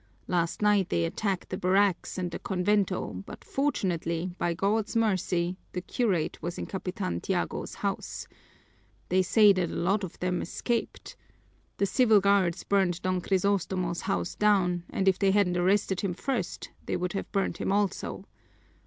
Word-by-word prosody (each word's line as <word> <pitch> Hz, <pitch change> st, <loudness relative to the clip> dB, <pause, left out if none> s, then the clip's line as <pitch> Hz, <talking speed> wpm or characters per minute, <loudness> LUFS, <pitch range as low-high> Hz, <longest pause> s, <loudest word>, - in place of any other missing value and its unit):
Last 175 Hz, +2 st, 0 dB
night 205 Hz, -3 st, +3 dB
they 85 Hz, -1 st, +1 dB
attacked 195 Hz, -, -2 dB
the 185 Hz, -, -3 dB
barracks 190 Hz, 0 st, +2 dB
and 180 Hz, -2 st, -2 dB
the -, -, -5 dB
convento, 190 Hz, -, 0 dB
but -, -, -10 dB
fortunately, 180 Hz, -, -1 dB
by 170 Hz, -1 st, 0 dB
God's 210 Hz, +5 st, 0 dB
mercy, 185 Hz, -5 st, +1 dB, 0.2 s
the 180 Hz, -, -2 dB
curate 185 Hz, -6 st, -1 dB
was 170 Hz, +2 st, -4 dB
in -, -, -4 dB
Capitan 180 Hz, -, -3 dB
Tiago's -, -, -2 dB
house. -, -, -4 dB, 0.8 s
They 185 Hz, +1 st, +4 dB
say 205 Hz, +2 st, +6 dB
that 180 Hz, -2 st, 0 dB
a -, -, -5 dB
lot 195 Hz, +4 st, +1 dB
of 185 Hz, -, -6 dB
them 180 Hz, -1 st, -1 dB
escaped. 230 Hz, +6 st, -3 dB, 0.6 s
The 200 Hz, -, +2 dB
civil 220 Hz, +1 st, +4 dB
guards 195 Hz, -3 st, +2 dB
burned 190 Hz, -4 st, +1 dB
Don 185 Hz, -1 st, 0 dB
Crisostomo's 185 Hz, -2 st, 0 dB
house 195 Hz, -, -1 dB
down, 180 Hz, -5 st, +2 dB
and 195 Hz, -, -1 dB
if 190 Hz, -, +4 dB
they 195 Hz, -, +3 dB
hadn't 190 Hz, -2 st, +3 dB
arrested 190 Hz, +1 st, +2 dB
him 190 Hz, -4 st, -2 dB
first 270 Hz, +8 st, -3 dB, 0.2 s
they -, -, 0 dB
would 180 Hz, 0 st, -2 dB
have 195 Hz, -, -4 dB
burned 195 Hz, -1 st, 0 dB
him -, -, -1 dB
also." 200 Hz, -1 st, -1 dB
190 Hz, 160 wpm, -28 LUFS, 180-200 Hz, 0.8 s, say